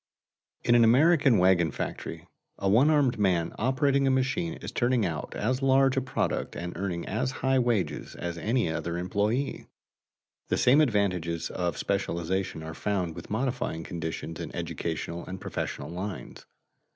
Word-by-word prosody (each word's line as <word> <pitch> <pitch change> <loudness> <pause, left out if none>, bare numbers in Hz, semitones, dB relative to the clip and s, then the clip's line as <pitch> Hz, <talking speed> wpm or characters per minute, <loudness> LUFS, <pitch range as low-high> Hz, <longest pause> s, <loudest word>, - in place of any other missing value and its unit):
In 120 - +3
an 120 -1 +6
American 140 +1 +5
wagon 90 -2 +4
factory, - - -5 0.3
a 100 - -1
one 120 +10 +5
armed 145 -7 +3
man 90 -5 +1
operating 135 +3 +2
a - - +4
machine 135 +6 0
is - - -7
turning 120 -3 +1
out 80 -4 -4
as 130 +5 -1
large 135 0 +4
a 135 - +2
product 130 - -2
and 85 +1 -5
earning 90 -2 -3
as 110 +5 -1 0.2
high 130 0 +4
wages 115 -10 -1
as 85 -1 -4
any 115 +7 0
other 85 +1 -3
employee. 105 +9 -1 0.8
The - - 0
same 135 +5 +5
advantages 90 - 0
of 85 -4 -2
specialization 95 -3 -2
are 80 0 -6
found 90 -3 -1
with - - -10
modifying 115 -8 -2
conditions 80 -2 -5
in - - -5
educational 85 +1 -4
and 95 0 -6
professional - - -4
lines. 95 +3 -6
100 Hz, 150 wpm, -28 LUFS, 85-130 Hz, 0.8 s, an